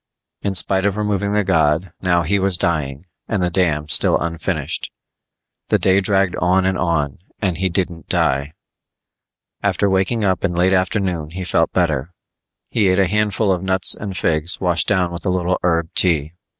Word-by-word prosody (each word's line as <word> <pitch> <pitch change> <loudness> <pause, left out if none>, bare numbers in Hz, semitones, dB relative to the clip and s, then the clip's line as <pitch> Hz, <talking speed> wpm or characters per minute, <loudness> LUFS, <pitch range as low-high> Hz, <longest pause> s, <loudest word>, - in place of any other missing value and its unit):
In 100 -1 -2
spite 95 +1 +1
of 100 0 -2
removing 105 -1 -1
the 105 0 +2
god, 85 -1 +1
now 85 -2 +2
he 100 +2 +1
was 95 -2 +2
dying 75 -3 -2 0.2
and 105 -5 -1
the 90 - 0
dam 80 -5 0
still 75 - +4
unfinished. 85 -2 -3 0.8
The - - +3
day 95 +1 +3
dragged 95 -1 +1
on 90 +2 +2
and 95 0 +1
on 75 -7 -1 0.2
and 90 -4 -1
he 95 0 +1
didn't 85 -2 -3
die. 70 +3 0 1.1
After 100 - +1
waking 95 +4 +1
up 95 -2 0
in 90 -3 0
late 90 +2 +2
afternoon 90 -4 0
he 95 +3 -6
felt 90 - +1
better. 75 +7 -1 0.6
He 105 -4 +2
ate 95 0 +2
a 95 - +4
handful 105 +1 +1
of 90 -2 0
nuts 95 0 +2
and 100 -3 -6
figs 80 +2 0
washed 85 -3 +1
down 90 -4 +1
with 85 -1 -6
a 100 - -1
little 90 0 0
herb 85 -2 0
tea. 80 -4 +1
90 Hz, 175 wpm, -19 LUFS, 85-95 Hz, 1.1 s, still